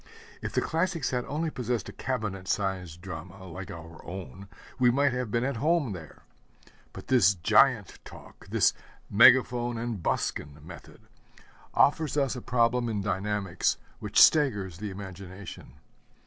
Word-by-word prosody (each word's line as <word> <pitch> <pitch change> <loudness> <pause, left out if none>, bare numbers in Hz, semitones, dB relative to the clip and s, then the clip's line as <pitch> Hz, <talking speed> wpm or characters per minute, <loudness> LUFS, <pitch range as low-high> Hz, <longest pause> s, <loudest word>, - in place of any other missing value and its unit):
If - - -5
the - - +2
classics 165 -3 -1
had 125 -1 -1
only 155 +3 -2
possessed 120 -5 -2
a - - -7
cabinet 105 -8 -4
sized 95 -5 -2
drama, 95 +1 -8
like 95 +1 -8
our 80 0 -10
own, 95 +2 -8 0.3
we 125 -1 +5
might 140 +2 +2
have 125 -2 -2
been 120 +3 0
at 135 -2 -1
home 150 -2 +1
there. 85 -6 -10 0.7
But - - -10
this 105 -7 +4
giant 105 +4 +3
talk, - - -14
this - - +3 0.4
megaphone 120 +1 +5
and 115 -4 -4
buskin 75 -2 -2
method, - - -12 0.7
offers 150 -1 +3
us 135 -2 +1
a 125 - -6
problem 120 0 +1
in 105 -2 -2
dynamics 100 -2 -1 0.2
which - - +1
staggers 105 - +4
the 105 0 -4
imagination. 95 0 -9
110 Hz, 145 wpm, -28 LUFS, 95-125 Hz, 0.7 s, we